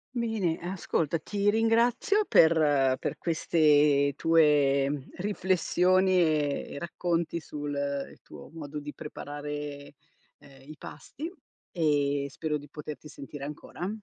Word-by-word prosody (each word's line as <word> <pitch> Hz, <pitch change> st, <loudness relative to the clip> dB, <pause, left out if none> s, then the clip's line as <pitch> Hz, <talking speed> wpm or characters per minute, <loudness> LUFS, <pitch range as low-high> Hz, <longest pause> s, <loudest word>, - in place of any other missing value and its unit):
Bene, 220 Hz, -8 st, -1 dB
ascolta, 170 Hz, -3 st, -2 dB
ti 200 Hz, +5 st, 0 dB
ringrazio 235 Hz, -, +2 dB
per 145 Hz, -5 st, +4 dB
per -, -, -3 dB
queste 150 Hz, -4 st, +3 dB
tue, 150 Hz, -4 st, +4 dB
mhmm, 145 Hz, -2 st, -3 dB
riflessioni 185 Hz, -1 st, +2 dB
e 155 Hz, -4 st, +1 dB
e -, -, -6 dB
racconti 170 Hz, 0 st, -2 dB
sul 145 Hz, -2 st, -6 dB, 0.4 s
il -, -, -17 dB
tuo -, -, -13 dB
modo 150 Hz, -1 st, -7 dB
di 145 Hz, 0 st, -7 dB
preparare, 145 Hz, -1 st, -7 dB, 0.5 s
ehm, 135 Hz, 0 st, -17 dB
i 155 Hz, -, -8 dB
pasti 315 Hz, -, -8 dB, 0.4 s
e 145 Hz, -4 st, +1 dB
spero 150 Hz, +2 st, -3 dB
di 145 Hz, 0 st, -12 dB
poterti 150 Hz, +1 st, -8 dB
sentire 140 Hz, -1 st, -9 dB
ancora. 150 Hz, +5 st, -6 dB
155 Hz, 120 wpm, -28 LUFS, 145-180 Hz, 0.5 s, per